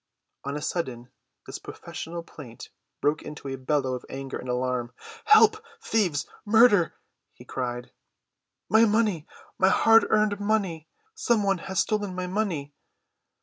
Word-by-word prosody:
On 140 +1 -3
a 150 - -6
sudden 125 -8 -4 0.3
this - - -7
professional 170 +1 -7
plaint 125 -8 -12 0.3
broke 150 +1 +1
into 150 -2 -9
a 135 - -3
bellow 130 0 -1
of 125 - -5
anger 135 0 -6
and 125 - -8
alarm. 125 -1 -2 0.3
"Help! 435 +1 +6 0.2
Thieves! 185 - 0 0.2
Murder!" 210 -4 +5 0.4
he - - -15
cried. 125 -1 -4 0.8
"My 220 +1 +5
money—my 205 -3 0
hard‐earned 215 -1 +4
money! 200 -7 -1 0.3
Some 235 - +1
one 195 -2 +1
has 190 +2 -1
stolen 205 -3 -2
my 180 0 -3
money!" 180 -7 -2
170 Hz, 130 wpm, -26 LUFS, 135-210 Hz, 0.8 s, Help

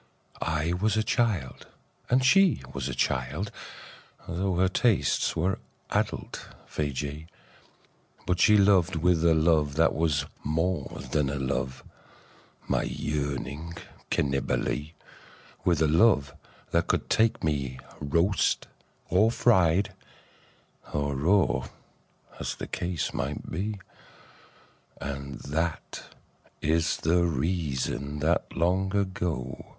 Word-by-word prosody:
I 80 +2 0
was 105 +4 +1
a 110 - +2
child, 105 - -1 0.4
and 130 +1 +3
she 185 - +5
was - - -3
a - - -4
child - - -1 0.4
— - - -22
Tho' 90 +2 -1
her 95 +2 +3
tastes 110 +3 +2
were 90 +4 0 0.3
adult - - -2 0.2
Feejee 75 +2 -3 0.5
— - - -33
But 90 -1 0
she 105 +4 +6
loved 95 -3 +4
with 85 0 +2
a 85 -1 +5
love 80 -3 +3
that 80 +1 +4
was 75 -4 +1 0.2
more 80 +1 -1
than 70 -2 0
love, 65 -1 -2 0.8
My - - +1
yearning 75 +2 -3 0.3
Cannibalee; 70 +2 -1 0.7
With 85 -3 +3
a - - +4
love 75 -4 +4 0.4
that - - +2
could - - 0
take 110 0 +2
me 70 -5 -1 0.2
roast 85 +7 +1 0.4
or 100 +6 +4
fried 95 -4 +3 1.0
Or 70 -1 -1
raw, 90 +7 +2 0.7
as - - -3
the - - -6
case 85 -2 -3
might - - -4
be. 100 +4 -3 1.2
And 70 -1 -6
that 80 +3 -3 0.4
is 80 +2 +1
the 85 +3 +2
reason 75 -3 -1
that 80 +2 0
long 95 +3 +1
ago. 90 -9 -2
80 Hz, 115 wpm, -27 LUFS, 75-95 Hz, 1.2 s, she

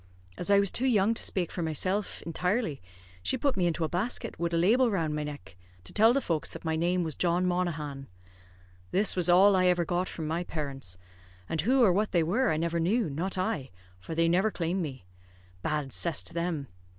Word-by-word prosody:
As 180 - -1
I 200 - +6
was 200 -1 +2
too 260 - +1
young 215 -3 +3
to - - -2
spake 180 -4 0
for 175 - -4
myself 185 +6 -2
intirely, 180 - -1 0.4
she 90 - -1
put 280 -2 0
me 180 -2 +1
into 170 0 -1
a - - +1
basket, 185 +2 -3
wid 170 0 -1
a 170 - +1
label 230 +9 +4
round 165 -7 -1
my 150 - -2
neck, 145 - -8 0.3
to 90 - -12
tell 220 +2 +5
the 270 - +2
folks 165 - -2
that - - -9
my 160 0 0
name 175 +2 +1
was 160 -2 -3
John 175 +1 +1
Monaghan. 155 -6 -2 0.8
This 200 +2 +2
was 180 -1 +1
all 190 +3 +6
I 185 -1 +3
ever 175 -1 +2
got 180 +2 -1
from 160 - -6
my 165 +3 -1
parents; 135 - -5 0.5
and 160 - -1
who 255 +8 +3
or 195 -6 +5
what 205 +3 0
they 170 -2 +3
were, 225 +11 +1
I 155 - +1
never 170 +1 -1
knew, 185 +1 +1
not 180 +7 -3
I, 155 -7 -2 0.3
for 160 - -7
they 165 +1 +3
never 185 +6 +3
claimed 180 -1 -2
me; 130 - -6 0.6
bad 150 -1 -2
cess 170 -2 +3
to - - -9
them! 170 -4 -2
175 Hz, 215 wpm, -29 LUFS, 160-195 Hz, 0.8 s, I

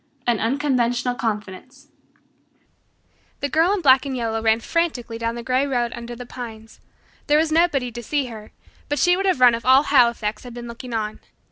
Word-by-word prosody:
An 235 -3 +1
Unconventional 245 -1 0
Confidence 210 -6 -5 1.5
The 285 - -2
Girl 325 +6 +3
in 405 -2 0
Black 265 -4 +5
and 270 -2 -4
Yellow 225 -2 -2
ran 220 0 +3
frantically 245 -6 -2
down 230 0 -2
the 235 - -6
grey 260 +3 +1
road 240 -3 -1
under 235 0 -7
the 245 +1 -9
pines. 225 -3 -10 0.5
There 295 0 +4
was 315 0 +1
nobody 310 -7 +2
to 240 +1 -7
see 280 +4 -1
her, 220 -3 -10 0.4
but 290 - -1
she 355 +3 +4
would 390 +1 -1
have 370 -8 +1
run 250 -2 +7
if 230 0 -3
all 260 +2 +5
Halifax 235 -6 +2
had 245 -1 -10
been 240 0 -7
looking 235 +1 -7
on. 215 -1 -3
245 Hz, 190 wpm, -22 LUFS, 230-280 Hz, 1.5 s, run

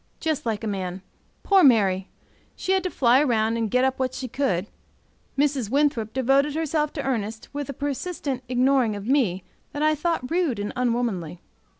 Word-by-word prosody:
Just 315 -6 -2
like 220 -1 -2
a - - -2
man! 185 -2 -4 0.4
Poor 390 -2 +5
Mary! 195 -8 +4 0.5
she 375 - -3
had 380 0 +3
to 365 - -2
fly 255 -2 +4
round 225 -4 +1
and 225 -2 -1
get 250 +4 +2
up 265 0 0
what 260 -1 -1
she 255 - -4
could; 220 -8 -1 0.7
Mrs. 275 -6 +1
Winthrop 275 -5 +1
devoted 270 +4 +2
herself 310 -1 0
to 285 - -4
Ernest 225 -4 -3
with 285 -1 -4
a - - -3
persistent 285 -1 -3
ignoring 255 -3 +2
of 205 0 -7
me 225 -9 +1 0.3
that 290 - -2
I 310 0 +4
thought 310 -3 -2
rude 335 - +1
and 205 0 -4
unwomanly. 230 -9 -1
255 Hz, 180 wpm, -24 LUFS, 220-290 Hz, 0.7 s, Poor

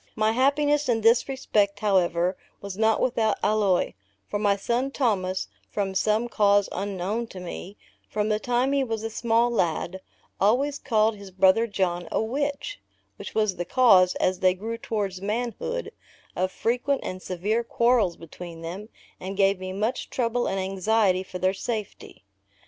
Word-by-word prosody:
My 215 0 +2
happiness 285 +3 +2
in 225 -2 +2
this 230 +4 +4
respect, 205 -6 0
however, 180 -3 +2 0.2
was 200 -2 -7
not 220 +1 +2
without 225 -4 +1
alloy; 205 -4 +2 0.3
for 205 - -2
my 205 -1 +3
son 240 +6 -1
Thomas, 195 -9 0 0.2
from 195 -2 -2
some 215 +4 +1
cause 205 -3 +3
unknown 200 +4 -3
to 190 - -9
me, 180 +2 -8 0.3
from 210 0 -1
the 215 0 +1
time 245 +3 +1
he 280 -1 +2
was 225 -3 -3
a 225 - -3
small 235 +1 +2
lad, 180 -2 -1 0.4
always 275 +8 +2
called 220 -3 +2
his 200 -1 -10
brother 190 +5 +4
John, 180 -4 -1
a - - +1
witch, 285 - -2 0.4
which - - -8
was 215 -3 +1
the 175 - -1
cause, 185 -5 +5
as 185 0 0
they 185 -1 +3
grew 225 +4 -5
towards 200 -5 -3
manhood, 245 - -3 0.4
of 185 +1 0
frequent 250 +7 0
and 185 0 -5
severe 205 +7 -1
quarrels 235 -6 +2
between 165 0 -10
them, 190 +6 -6 0.3
and 190 +1 -6
gave 195 -1 +3
me 185 0 -5
much 210 +6 -2
trouble 240 -1 0
and 195 - -1
anxiety 195 0 +1
for 185 -1 -7
their 185 +1 +1
safety. 215 - -6
210 Hz, 160 wpm, -25 LUFS, 190-235 Hz, 0.4 s, cause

